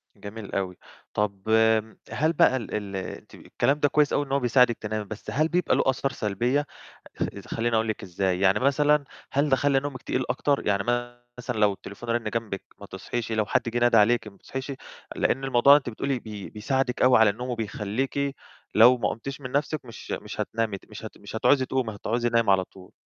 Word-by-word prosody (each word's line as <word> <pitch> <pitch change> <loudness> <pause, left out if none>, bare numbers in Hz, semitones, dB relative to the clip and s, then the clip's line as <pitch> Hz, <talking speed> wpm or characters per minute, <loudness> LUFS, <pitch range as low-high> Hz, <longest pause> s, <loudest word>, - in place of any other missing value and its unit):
جميل 105 0 -9
أوي. 95 -2 -2 0.4
طَب 100 -2 -1 0.7
هل 155 +2 +1
بقى 130 - +4
ال 115 - -7
ال 100 -2 -4
أنتِ 95 - -7
الكلام 145 +2 -1
ده 145 - +4
كويس 150 -1 +2
أوي 145 - +1
إن 135 - -11
هو 140 - +2
بيساعدِك 125 -2 +3
تنامي، 110 -1 -4
بس 110 +1 -7
هل 155 +3 +2
بيبقى 180 0 +1
له - - +2
آثار 135 +1 +1
سلبية؟ 120 +6 0 0.8
خلّيني 115 0 -1
أقول 110 0 +1
لِك 110 - -3
إزاي، 90 0 -1
يعني 95 +2 +3
مثلًا 145 +2 +3 0.3
هل 145 +2 +1
ده 135 - +5
خلّي 140 0 +2
نومِك 135 -2 -6
تقيل 130 - -1
أكتر، 140 -1 0
يعني 100 -1 +2 0.5
مثلًا 125 -2 -4
لو 105 -1 +4
التليفون 100 +4 -10
رَنّ 115 -2 0
جنبِك 110 -4 -3 0.2
ما 100 - -9
تصحيش؟ 115 +5 -5
لو 110 -1 +1
حد 130 +5 +1
جِه 120 +1 +2
ندَه 115 -2 +5
عليكِ 115 +2 +3
ما 100 - -11
بتصحيش؟ 135 +6 -6 0.4
لأن 135 - 0
الموضوع 135 +1 +6
أنتِ 135 -4 -4
بتقولي 130 +3 -2
بي 105 -4 -8
بيساعدِك 125 +3 -1
أوي 125 0 +6
على 110 -1 +6
النوم، 120 +5 -4
وبيخلّيكِ 120 +5 -2 0.4
لو 120 +4 +7
ما 120 - 0
قُمتيش 135 +5 -6
من 125 -2 -7
نَفْسِك 145 +1 -1
مش 115 - -10
مش - - -4
هتنامي 110 -3 -2
ت - - -22
مش 105 +1 -8
هت 110 - -9
مش 100 +1 -10
هتعوزي 130 +4 +3
تقومي، 125 -5 -2
هتعوزي 120 +3 -1
نايمة 115 -3 +3
على 95 -1 +3
طول. 95 0 -16
120 Hz, 200 wpm, -26 LUFS, 105-135 Hz, 0.8 s, لو